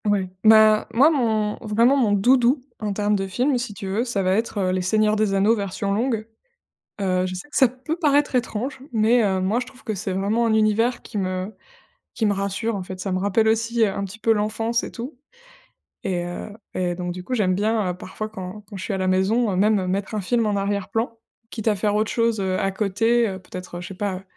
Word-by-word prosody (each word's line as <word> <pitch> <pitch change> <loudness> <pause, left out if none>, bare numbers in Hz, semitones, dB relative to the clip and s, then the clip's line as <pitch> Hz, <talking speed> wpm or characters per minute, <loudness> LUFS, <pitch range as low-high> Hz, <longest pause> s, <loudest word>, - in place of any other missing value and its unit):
Ouais, 200 -2 +1 0.2
bah, 215 -1 +6
moi, 280 +7 +6
mon 220 -7 0
vraiment, 230 +4 +3
mon 240 -7 +2
doudou, 250 +5 +3 0.2
en 210 -1 -2
termes 205 +1 +1
de 195 -1 -2
film, 250 +6 +1
si 235 -4 -5
tu 195 - -7
veux, 200 +5 0
ça 235 -6 -1
va 185 0 +2
être, 225 +1 -1
heu, 185 -2 +1
les 185 0 0
Seigneurs 215 +3 +2
des 210 -2 +1
anneaux, 200 +3 +4
version 200 -1 -2
longue. 225 0 -1 0.8
Heu, 185 -1 +1
je 185 - -5
sais 185 +11 -8
que - - -12
ça 265 - +7
peut 260 +6 -5
paraître 290 -4 +2
étrange 250 +2 -2
mais 225 +2 +4
heu, 190 -2 +1
moi, 200 +6 +1
je 250 - -4
trouve 260 +1 -16
que 220 - -2
c'est 195 -1 -3
vraiment 205 +5 +1
un 225 - +2
univers 220 +3 +2
qui 215 - -7
me 185 +1 -2 0.6
qui 225 - 0
me 205 - +3
rassure, 200 +3 -2
en 195 - -3
fait. 185 0 -8
Ça 190 +1 -3
me 185 - 0
rappelle 205 +3 +2
aussi, 230 +1 +1
heu, 215 - +3
un 200 - -3
petit 195 +3 -7
peu 225 0 +1
l'enfance 225 +2 -1
et - - -6
tout 250 +2 -8 0.8
et 180 -2 -1
heu, 175 +4 -6 0.2
et 180 -1 0
donc 175 0 -4
du 180 +1 -7
coup, 255 - -5
j'aime 195 -6 +2
bien, 210 0 +1
heu, - - -1
parfois 215 +4 -6
quand 195 0 -7
quand 205 - -8
je 190 - -6
suis 210 - -3
à - - -1
la 185 - 0
maison, 200 +5 +2
heu, - - -1
même, 200 0 +2
mettre 195 +3 -2
un 215 - -1
film 230 +4 +1
en 210 -1 0
arrière-plan, 205 +4 -2 0.3
quitte 225 -1 -6
à 215 - +4
faire 205 +1 0
autre 215 0 +1
chose, 230 -2 +1
heu, 190 -1 0
à 195 - +1
côté, 225 +4 +1
heu, 190 -2 -5
peut-être, 180 -1 -8
heu, - - -6
je 175 - -7
sais 195 - -8
pas 190 -1 -3
210 Hz, 240 wpm, -23 LUFS, 190-230 Hz, 0.8 s, ça